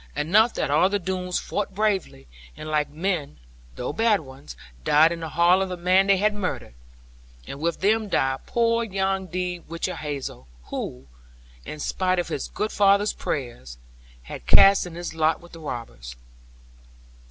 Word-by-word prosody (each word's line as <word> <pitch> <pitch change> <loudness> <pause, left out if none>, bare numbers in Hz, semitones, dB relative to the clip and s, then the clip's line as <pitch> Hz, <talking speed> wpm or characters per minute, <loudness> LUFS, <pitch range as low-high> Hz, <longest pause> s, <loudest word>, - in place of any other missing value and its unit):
Enough 200 +11 +3
that - - -1
all 160 +6 +4
the 205 - +1
Doones 185 -1 -3
fought 200 -2 -3
bravely; 200 - -1 0.3
and - - -8
like 150 -1 0
men 160 -1 -3 0.4
(though - - -4
bad 220 0 +2
ones) 130 - -12 0.3
died 155 - +5
in 170 - -4
the 160 -1 -5
hall 170 +4 +4
of 190 - -1
the 180 - -4
man 185 +2 +3
they 200 -1 +5
had 210 +2 +2
murdered. 190 - -4 0.7
And 140 - -8
with 170 +2 -2
them 215 +2 +2
died 135 -6 0
poor 230 0 +1
young 195 -2 -1
De 180 0 -3
Whichehalse, 150 -4 -4 0.4
who, 65 +1 -5 0.6
in 155 - -7
spite 185 +4 0
of 175 - -1
his 140 - -3
good 215 0 -3
father's 200 +1 +3
prayers, 120 - -5 0.5
had - - -9
cast 195 -2 +6
in 170 - -10
his 175 -1 -5
lot 160 0 +1
with 175 - -16
the 165 - -11
robbers. - - -7
175 Hz, 165 wpm, -24 LUFS, 150-195 Hz, 0.7 s, cast